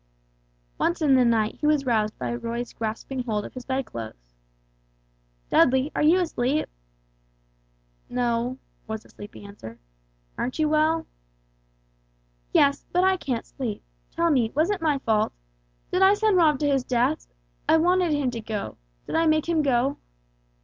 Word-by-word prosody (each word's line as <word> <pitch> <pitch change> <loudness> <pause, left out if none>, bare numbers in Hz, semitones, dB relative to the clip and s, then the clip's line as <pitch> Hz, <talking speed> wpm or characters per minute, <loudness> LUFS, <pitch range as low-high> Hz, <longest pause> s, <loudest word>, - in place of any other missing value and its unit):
Once 340 +1 +1
in 300 -4 +3
the 260 -1 +5
night 225 -2 +1
he 300 - +2
was 300 -2 +2
roused 215 -4 +1
by 125 -2 -3
Roy's 230 - -4
grasping 225 +4 -4
hold 215 -4 -2
of - - -9
his 255 -1 -8
bedclothes. 115 - -5 1.2
"Dudley, 265 +3 +4
are - - 0
you 320 +5 +5
asleep?" 300 -4 0 1.4
"No," 245 +1 -1 0.3
was 220 0 -5
the - - -20
sleepy 205 0 -11
answer, 160 - -10 0.6
"aren't 255 - -2
you 310 -1 +2
well?" 310 +1 +2 1.5
"Yes, 280 0 +3
but 360 +1 +2
I 380 0 +4
can't 255 -10 -3
sleep. 235 -6 -5 0.3
Tell 335 0 +1
me, 240 -6 +2
was 320 +7 +2
it 400 -4 -2
my 305 -3 +2
fault? 220 -5 +1 0.6
Did 365 - +1
I 385 +2 +7
send 425 -1 +2
Rob 315 -5 +4
to 295 - +2
his 275 -3 +2
death? 255 +5 0 0.4
I - - +6
wanted 355 +1 +3
him 290 -4 +1
to 230 -2 -5
go. 215 -2 -5 0.3
Did - - -7
I 325 0 +3
make 310 0 +2
him 335 -2 +2
go?" 270 -1 +1
265 Hz, 155 wpm, -25 LUFS, 230-315 Hz, 1.5 s, I